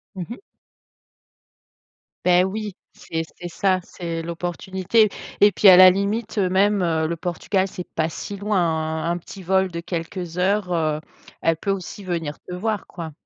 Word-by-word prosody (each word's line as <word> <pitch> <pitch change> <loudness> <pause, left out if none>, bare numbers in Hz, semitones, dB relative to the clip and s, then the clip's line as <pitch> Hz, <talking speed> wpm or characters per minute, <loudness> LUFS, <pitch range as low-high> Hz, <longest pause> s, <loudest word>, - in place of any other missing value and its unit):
Mmh 180 -2 -4
mh. 235 - -6 1.9
Beh, 180 0 +5
oui, 205 +1 -3 0.2
c'est 165 0 -4 0.2
c'est 175 - -5
ça, 185 +2 +1
c'est 170 -2 -5
l'opportunité 185 +5 0 0.3
et 205 0 +7
puis, 200 +2 +4
à 180 - +9
la 185 0 +10
limite, 205 +4 -2
heu, 185 -2 +2
même, 200 +1 +3
heu, 160 -2 +1
le 170 - -2
Portugal 180 +3 -1
c'est 180 -1 -8
pas 160 0 +1
si 200 - -6
loin, 205 +1 0
hein, 160 -1 0
un 175 - -1
petit 190 +2 -11
vol 190 +1 +2
de 170 - -4
quelques 170 0 -5
heures, 185 0 +1
heu, 155 -2 0 0.4
elle 165 -1 +2
peut 200 +5 -1
aussi 195 +1 -5
venir 165 -5 -3
te 180 - -10
voir, 215 +2 -2
quoi. 165 -3 -7
180 Hz, 170 wpm, -23 LUFS, 170-195 Hz, 1.9 s, la